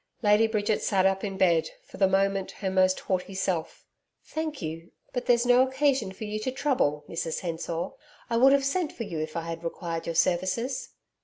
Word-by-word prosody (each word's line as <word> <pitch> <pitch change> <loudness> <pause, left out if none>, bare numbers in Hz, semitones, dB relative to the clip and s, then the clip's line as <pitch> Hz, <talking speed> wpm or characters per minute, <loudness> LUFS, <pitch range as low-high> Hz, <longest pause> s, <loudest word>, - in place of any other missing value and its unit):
Lady 210 +2 +5
Bridget 215 -1 0
sat 190 -2 +2
up 195 0 +2
in 195 -2 -3
bed, 170 -4 +3
for - - -13
the 195 - +4
moment 195 0 +1
her 190 -2 -3
most 185 0 +3
haughty 185 0 -2
self. 185 -4 -2 0.4
'Thank 315 -2 -4
you; 165 0 -6 0.2
but 245 - -3
there's 240 0 +4
no 245 +1 +6
occasion 265 -5 +1
for 190 - -9
you 215 0 -3
to 235 +4 -2
trouble, 250 - 0
Mrs 165 -1 -3
Hensor. 170 -1 -3 0.4
I 235 - -1
would 265 +3 +7
have 280 -1 +3
sent 320 +3 0
for 230 - -6
you 175 -7 -5
if 155 +1 -4
I - - -1
had 165 0 -6
required 165 -1 -4
your 165 - -2
services.' 185 +10 0
195 Hz, 200 wpm, -27 LUFS, 170-245 Hz, 0.4 s, would